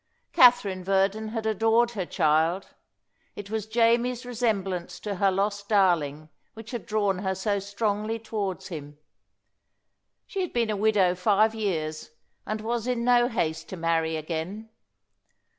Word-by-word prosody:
Katherine 240 Hz, -7 st, +5 dB
Verdon 195 Hz, +3 st, +1 dB
had 220 Hz, 0 st, -4 dB
adored 225 Hz, +2 st, +2 dB
her 195 Hz, -6 st, -4 dB
child; 160 Hz, +5 st, +1 dB, 0.7 s
it 205 Hz, 0 st, -8 dB
was 220 Hz, -1 st, -3 dB
Jamie's 235 Hz, +2 st, +2 dB
resemblance 200 Hz, -7 st, -2 dB
to 205 Hz, -2 st, -4 dB
her 195 Hz, +1 st, +3 dB
lost 200 Hz, +1 st, -1 dB
darling 160 Hz, -7 st, +2 dB, 0.3 s
which 225 Hz, +1 st, -10 dB
had 240 Hz, -3 st, -6 dB
drawn 205 Hz, -3 st, 0 dB
her 190 Hz, -1 st, -1 dB
so 200 Hz, +1 st, -1 dB
strongly 210 Hz, +2 st, -2 dB
towards 200 Hz, -4 st, -4 dB
him. 145 Hz, -4 st, -8 dB, 1.3 s
She 390 Hz, -, -4 dB
had 365 Hz, -, -3 dB
been 230 Hz, -2 st, +1 dB
a -, -, -1 dB
widow 200 Hz, -3 st, +3 dB
five 210 Hz, +4 st, +2 dB
years, 160 Hz, -9 st, -3 dB, 0.4 s
and 215 Hz, 0 st, -3 dB
was 235 Hz, +1 st, -2 dB
in 245 Hz, -2 st, -1 dB
no 245 Hz, 0 st, +4 dB
haste 165 Hz, -10 st, -2 dB
to 190 Hz, -, -6 dB
marry 165 Hz, -1 st, 0 dB
again. 170 Hz, +8 st, -5 dB
205 Hz, 140 wpm, -26 LUFS, 185-225 Hz, 1.3 s, Katherine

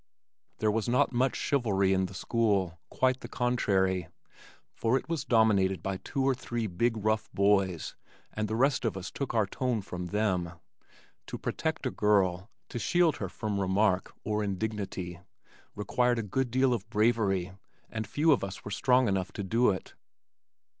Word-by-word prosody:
There 110 Hz, -1 st, +2 dB
was 110 Hz, +2 st, -1 dB
not 125 Hz, +1 st, +3 dB
much 130 Hz, +2 st, +1 dB
chivalry 100 Hz, -9 st, +1 dB
in 95 Hz, 0 st, +1 dB
the 95 Hz, -, -11 dB
school 100 Hz, -5 st, 0 dB
quite 130 Hz, 0 st, +1 dB
the -, -, -8 dB
contrary, 95 Hz, -8 st, +1 dB, 0.7 s
for 115 Hz, +3 st, +1 dB
it -, -, -6 dB
was 165 Hz, -5 st, -2 dB
dominated 105 Hz, -6 st, +3 dB
by 95 Hz, -1 st, -2 dB
two 135 Hz, +7 st, -3 dB
or 135 Hz, -, +4 dB
three 120 Hz, -2 st, -3 dB
big 115 Hz, +5 st, 0 dB
rough 110 Hz, 0 st, 0 dB
boys 95 Hz, -4 st, +1 dB, 0.4 s
and 110 Hz, 0 st, -2 dB
the 110 Hz, -, -2 dB
rest 130 Hz, +2 st, +2 dB
of 110 Hz, -5 st, -1 dB
us 95 Hz, -1 st, -6 dB
took 135 Hz, -4 st, -4 dB
our 110 Hz, -2 st, +3 dB
tone 125 Hz, +3 st, -1 dB
from 90 Hz, -1 st, -5 dB
them. 95 Hz, -4 st, 0 dB, 0.7 s
To -, -, -5 dB
protect -, -, -3 dB
a -, -, 0 dB
girl, 95 Hz, -2 st, +2 dB, 0.2 s
to 120 Hz, -, -4 dB
shield 170 Hz, -, +2 dB
her 95 Hz, -, -4 dB
from 105 Hz, 0 st, -3 dB
remark 95 Hz, 0 st, +1 dB
or 105 Hz, 0 st, -1 dB
indignity 95 Hz, -3 st, -3 dB, 0.6 s
required 120 Hz, +4 st, +1 dB
a 115 Hz, -, -1 dB
good 125 Hz, +5 st, -1 dB
deal 130 Hz, +1 st, +3 dB
of 110 Hz, -2 st, -4 dB
bravery 105 Hz, -5 st, +1 dB, 0.4 s
and 110 Hz, -1 st, -5 dB
few 155 Hz, +2 st, +2 dB
of 135 Hz, -, +3 dB
us 95 Hz, 0 st, -6 dB
were 105 Hz, -, -5 dB
strong 125 Hz, +4 st, +3 dB
enough 95 Hz, -2 st, -1 dB
to 100 Hz, -, -4 dB
do 115 Hz, +6 st, +3 dB
it. 95 Hz, -3 st, -3 dB
105 Hz, 170 wpm, -29 LUFS, 95-120 Hz, 0.7 s, or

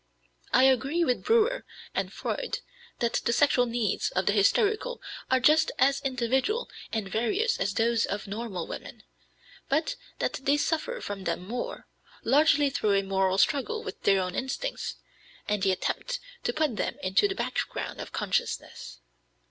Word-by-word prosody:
I -, -, +5 dB
agree 270 Hz, +6 st, +3 dB
with 250 Hz, -6 st, 0 dB
Breuer 465 Hz, +2 st, +3 dB, 0.3 s
and -, -, -1 dB
Freud -, -, -3 dB, 0.4 s
that 235 Hz, -1 st, 0 dB
the -, -, +1 dB
sexual 250 Hz, -1 st, +4 dB
needs 230 Hz, -4 st, 0 dB
of 185 Hz, 0 st, -1 dB
the 205 Hz, -, +3 dB
hysterical 430 Hz, -, +2 dB, 0.3 s
are 260 Hz, -, +4 dB
just 305 Hz, +5 st, +4 dB
as 275 Hz, +1 st, +3 dB
individual 265 Hz, -, 0 dB, 0.2 s
and 220 Hz, -3 st, -2 dB
various 380 Hz, -, 0 dB
as 195 Hz, 0 st, -1 dB
those 230 Hz, 0 st, +2 dB
of 205 Hz, -, -3 dB
normal 200 Hz, -4 st, -4 dB
women, -, -, -8 dB, 0.7 s
but 315 Hz, -, +1 dB, 0.2 s
that -, -, -1 dB
they 280 Hz, +2 st, +3 dB
suffer 325 Hz, +11 st, -1 dB
from 195 Hz, -2 st, -5 dB
them 170 Hz, +2 st, -2 dB
more, 245 Hz, +3 st, -4 dB, 0.4 s
largely 290 Hz, +2 st, +4 dB
through 210 Hz, -5 st, +1 dB
a 195 Hz, -, +2 dB
moral 190 Hz, -1 st, +1 dB
struggle 370 Hz, -, +1 dB
with -, -, -7 dB
their 195 Hz, -1 st, +4 dB
own 180 Hz, -1 st, -3 dB
instincts, 275 Hz, -, -3 dB, 0.5 s
and 210 Hz, -1 st, 0 dB
the 195 Hz, -1 st, +3 dB
attempt -, -, -2 dB, 0.3 s
to -, -, +2 dB
put 300 Hz, -8 st, 0 dB
them -, -, -1 dB
into 190 Hz, -, +3 dB
the 390 Hz, -, -3 dB
background -, -, -3 dB
of -, -, -8 dB
consciousness. 185 Hz, -, -3 dB
250 Hz, 155 wpm, -28 LUFS, 205-315 Hz, 0.7 s, I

